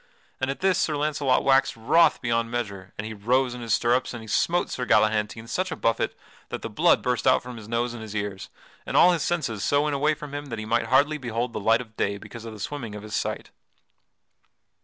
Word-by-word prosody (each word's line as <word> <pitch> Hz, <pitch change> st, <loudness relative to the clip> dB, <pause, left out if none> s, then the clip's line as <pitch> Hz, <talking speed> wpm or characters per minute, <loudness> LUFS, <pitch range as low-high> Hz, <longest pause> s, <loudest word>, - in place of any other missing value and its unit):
At 135 Hz, +1 st, -2 dB
this 190 Hz, -2 st, +3 dB
Sir 155 Hz, -, +1 dB
Launcelot 145 Hz, -3 st, +1 dB
waxed 135 Hz, -2 st, +3 dB
wroth 165 Hz, +10 st, +3 dB
beyond 115 Hz, -1 st, 0 dB
measure 100 Hz, -6 st, -4 dB
and 105 Hz, -, -4 dB
he 110 Hz, -, -5 dB
rose 125 Hz, +5 st, +1 dB
in 125 Hz, -, -7 dB
his 115 Hz, -4 st, +1 dB
stirrups 120 Hz, +3 st, +1 dB
and 115 Hz, -, -7 dB
he -, -, -11 dB
smote 175 Hz, +10 st, +1 dB
Sir 125 Hz, -, -3 dB
Galahantine 110 Hz, -1 st, +2 dB
such 185 Hz, +8 st, -2 dB
a -, -, -2 dB
buffet 115 Hz, -, 0 dB, 0.3 s
that -, -, -5 dB
the -, -, -5 dB
blood -, -, +3 dB
burst 125 Hz, +1 st, 0 dB
out 130 Hz, -, +4 dB
from 125 Hz, 0 st, -8 dB
his 110 Hz, -2 st, -10 dB
nose 120 Hz, +1 st, -1 dB
and 120 Hz, -, -8 dB
his 110 Hz, -1 st, -8 dB
ears, 100 Hz, -2 st, -4 dB, 0.3 s
and -, -, -1 dB
all 180 Hz, -, +7 dB
his 170 Hz, -3 st, 0 dB
senses 125 Hz, -, -1 dB
so 145 Hz, 0 st, +2 dB
went 150 Hz, -1 st, 0 dB
away 150 Hz, +2 st, +2 dB
from 150 Hz, -2 st, -9 dB
him 145 Hz, 0 st, -5 dB
that 115 Hz, -4 st, -5 dB
he 110 Hz, -, -5 dB
might 115 Hz, +2 st, +1 dB
hardly 145 Hz, +4 st, +3 dB
behold 120 Hz, -1 st, -3 dB
the -, -, -3 dB
light 115 Hz, +3 st, +3 dB
of 110 Hz, -2 st, -13 dB
day 100 Hz, 0 st, 0 dB
because 115 Hz, +2 st, -10 dB
of 115 Hz, -, -7 dB
the 105 Hz, -, -11 dB
swimming 115 Hz, -2 st, -5 dB
of 105 Hz, -, -8 dB
his 105 Hz, 0 st, -9 dB
sight. -, -, -3 dB
120 Hz, 235 wpm, -25 LUFS, 110-140 Hz, 0.3 s, all